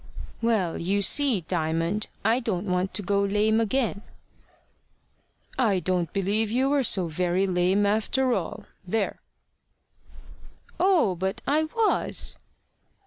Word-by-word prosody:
"Well, 215 -8 0
you 200 +4 0
see, 265 -4 +3
Diamond, 165 +4 -1 0.2
I 230 +3 +3
don't 210 -6 -2
want 180 0 -1
to 205 - -1
go 200 +1 +1
lame 210 +2 +2
again." 225 -2 -1 1.6
"I 210 -7 +2
don't 180 -3 -1
believe 205 +3 0
you 260 +5 +1
were 285 -1 +3
so 190 -6 +1
very 180 +3 0
lame 185 +2 +1
after 220 +5 +1
all 185 -7 -4 0.2
there!" 200 +3 -2 1.6
"Oh, 355 - +3
but 190 +3 -4
I 305 +3 +2
was." 435 +7 0
200 Hz, 120 wpm, -25 LUFS, 180-230 Hz, 1.6 s, see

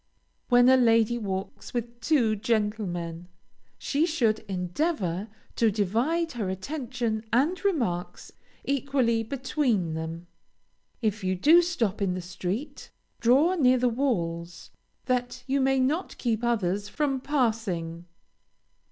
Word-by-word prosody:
When 245 -1 +6
a 260 0 +7
lady 230 -1 +3
walks 195 +4 -5
with 235 0 -4
two 240 -8 +2
gentlemen, 200 -6 -2 0.5
she 300 +4 0
should 230 -10 +1
endeavor 190 - -1 0.3
to 230 - +4
divide 235 - 0
her 215 -6 -3
attention 235 +1 -3
and 300 - +1
remarks 235 - -1 0.3
equally 265 -4 +1
between 240 - -1
them. 160 +2 -5 0.8
If 215 -1 0
you 185 0 0
do 315 - +6
stop 235 - -1
in 185 -2 +1
the - - -3
street, 190 - -5 0.3
draw 270 +10 +4
near 255 -7 +4
the 250 0 +2
walls, 175 -10 -2 0.3
that 250 0 -1
you 275 +1 +1
may 270 0 +2
not 295 +8 -1
keep 230 -2 -1
others 205 -4 0
from 275 -1 -1
passing. 215 - -1
230 Hz, 120 wpm, -27 LUFS, 190-270 Hz, 0.8 s, a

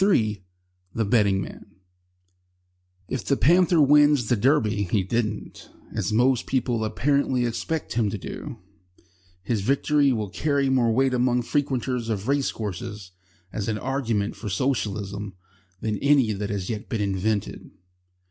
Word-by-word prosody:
III 110 - +2 0.5
THE 115 - 0
BETTING 100 -3 +2
MAN - - -12 1.3
If 130 - -3
The 140 - +1
Panther 175 +1 +4
wins 145 -4 +5
the 120 - +4
Derby,[He 105 - +1
didn't] 110 +1 -3 0.2
as 105 -2 -2
most 125 +3 +2
people 125 -4 0
apparently 130 +3 +1
expect 150 +7 -3
him 115 -3 +1
to 105 - -4
do, 125 +6 -7 0.9
his 105 +1 -1
victory 140 +4 +2
will 110 -5 -2
carry 140 +1 0
more 120 -3 +3
weight 130 +3 +2
among 125 0 +2
frequenters 125 -3 -1
of 105 -1 -2
race 140 0 +1
courses 105 -2 -6 0.4
as 105 - -3
an 110 -1 -1
argument 115 -5 -1
for 110 - -6
Socialism 105 -4 -2 0.5
than 105 -2 -2
any 140 -6 +3
that 100 0 -4
has 100 -2 -3
yet 110 -2 -5
been 110 - -1
invented. 100 +1 -2
115 Hz, 140 wpm, -24 LUFS, 105-135 Hz, 1.3 s, wins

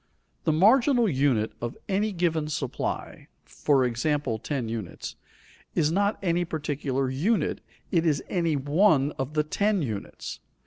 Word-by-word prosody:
The - - +4
marginal 235 - +5
unit 130 - +2
of 120 0 -4
any 205 +2 +1
given 165 -4 0
supply 150 -4 -4 0.2
for 135 -3 +2
example, 125 -1 0
ten 130 -2 -3
units 110 -5 -5 0.6
is 155 -2 +2
not 200 +4 +1
any 175 -1 +2
particular 145 -5 -2
unit, 190 - 0 0.3
it 170 -3 +3
is 155 -4 +1
any 170 -4 0
one 145 +1 +3
of 135 +3 -3
the 150 - +3
ten 200 +4 +1
units. 110 -6 -5
150 Hz, 135 wpm, -27 LUFS, 135-180 Hz, 0.6 s, marginal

